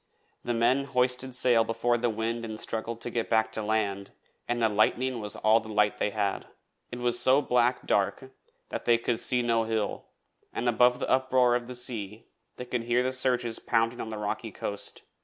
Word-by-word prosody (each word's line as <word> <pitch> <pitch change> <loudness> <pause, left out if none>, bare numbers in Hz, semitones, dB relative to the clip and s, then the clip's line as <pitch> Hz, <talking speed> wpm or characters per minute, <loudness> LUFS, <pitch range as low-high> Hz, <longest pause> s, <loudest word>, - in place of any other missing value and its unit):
Then 120 -1 -1
the - - -1
men 130 +4 +3
hoisted 125 -1 0
sail 120 -2 +4
before 115 +2 0
the 120 0 0
wind 115 +1 -2
and 110 -1 -6
struggled 115 +1 -3
to 120 - -5
get 115 -1 -2
back 110 -1 +2
to 110 - -3
land, 105 -2 -1 0.4
and 120 0 -1
the 115 - +3
lightning 120 +4 +1
was 105 -1 -4
all 110 +1 +4
the 110 -1 -11
light 105 -1 +1
they - - +1
had. 100 -2 -2 0.4
It 125 - -5
was 120 0 +1
so 130 +2 +5
black 125 -2 +1
dark 115 +6 0 0.4
that - - -5
they 120 -1 +5
could 115 0 -1
see 125 -1 +2
no 115 -1 +1
hill, 110 -2 -2 0.5
and 120 - -3
above 125 +1 +4
the - - -2
uproar 130 -2 +3
of 120 -1 -3
the 125 - -7
sea 115 -4 -3 0.3
they 125 - -7
could 125 -1 -3
hear 120 +1 +2
the 130 +1 -1
surges 125 -3 0
pounding 115 +2 0
on 110 - -5
the 110 - -5
rocky 105 +2 -4
coast. 100 +1 -5
115 Hz, 205 wpm, -28 LUFS, 110-125 Hz, 0.5 s, so